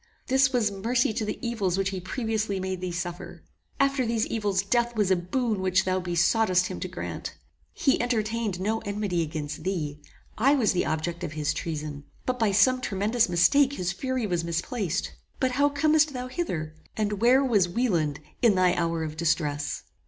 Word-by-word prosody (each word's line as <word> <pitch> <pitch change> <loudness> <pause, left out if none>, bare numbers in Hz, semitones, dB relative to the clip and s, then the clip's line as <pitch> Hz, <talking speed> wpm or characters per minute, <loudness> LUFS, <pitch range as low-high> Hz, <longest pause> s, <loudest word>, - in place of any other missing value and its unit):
This 265 0 +3
was 235 -5 +1
mercy 225 +4 +1
to 225 0 -2
the - - -3
evils 200 -6 0
which 195 0 0
he 190 - -3
previously 215 0 -2
made 185 -1 -3
thee 180 -1 -3
suffer! 175 +1 -6 0.4
After 275 -1 +2
these 230 -1 0
evils 205 -4 0
death 240 +3 +1
was 205 -3 +2
a - - +6
boon 210 +4 -1
which 185 -1 +2
thou 185 0 +1
besoughtest 180 +2 +2
him - - -5
to - - -3
grant. - - -6 0.4
He 270 -5 +1
entertained 225 -4 -1
no 215 +4 0
enmity 205 -4 -2
against 150 -2 -4
thee: 150 -6 -3 0.4
I 275 +6 +5
was 245 -7 +3
the 180 - 0
object 170 +2 -2
of 155 -3 -4
his 150 -1 -1
treason; 150 -2 -5 0.2
but 250 0 -1
by 220 -3 +3
some 255 +6 +4
tremendous 215 +1 +1
mistake 270 +11 +4
his 180 -9 -2
fury 260 +4 -2
was 175 -4 -1
misplaced. 170 +3 -2 0.3
But 260 -1 +1
how 285 +3 +3
comest 305 +1 +3
thou 250 0 -5
hither? 170 - -3 0.2
and 210 -1 -1
where 255 +4 +5
was 205 -8 +3
Wieland 170 - 0 0.2
in 230 -5 +5
thy 185 -1 +4
hour 165 -2 -1
of 155 -1 -5
distress? 155 -3 -1
200 Hz, 180 wpm, -26 LUFS, 175-240 Hz, 0.4 s, a